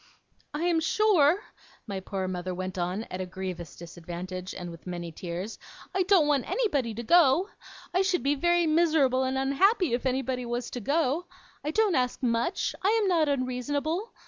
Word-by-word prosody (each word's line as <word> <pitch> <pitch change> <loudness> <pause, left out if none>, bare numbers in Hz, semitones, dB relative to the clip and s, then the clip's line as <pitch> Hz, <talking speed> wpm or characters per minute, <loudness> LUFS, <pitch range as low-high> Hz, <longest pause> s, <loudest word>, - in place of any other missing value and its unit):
'I 305 - -2
am 345 -2 +3
sure,' 360 0 +3 0.4
my 200 -3 -4
poor 190 0 -4
mother 180 0 -3
went 185 0 -4
on, 180 +5 -1
at 185 - -4
a - - -2
grievous 180 -3 -6
disadvantage, 175 +2 -7
and 175 -1 -6
with 165 +2 -12
many 175 -1 -5
tears, 175 +5 -6 0.3
'I 380 - +1
don't 385 -6 +5
want 285 -4 +1
anybody 290 - 0
to 235 - -5
go. 340 - +5 0.4
I 365 - +3
should 380 -2 +1
be 280 +1 +3
very 345 +3 +2
miserable 310 -5 +3
and 260 0 0
unhappy 305 - +2
if 245 +2 0
anybody 260 -1 -1
was 240 +1 -3
to 245 - -4
go. 300 - 0 0.4
I 295 - -2
don't 420 +4 +2
ask 250 -2 0
much. 240 - 0
I 390 - +4
am - - +1
not 330 -5 +3
unreasonable. 285 - -1
265 Hz, 175 wpm, -28 LUFS, -, 0.4 s, don't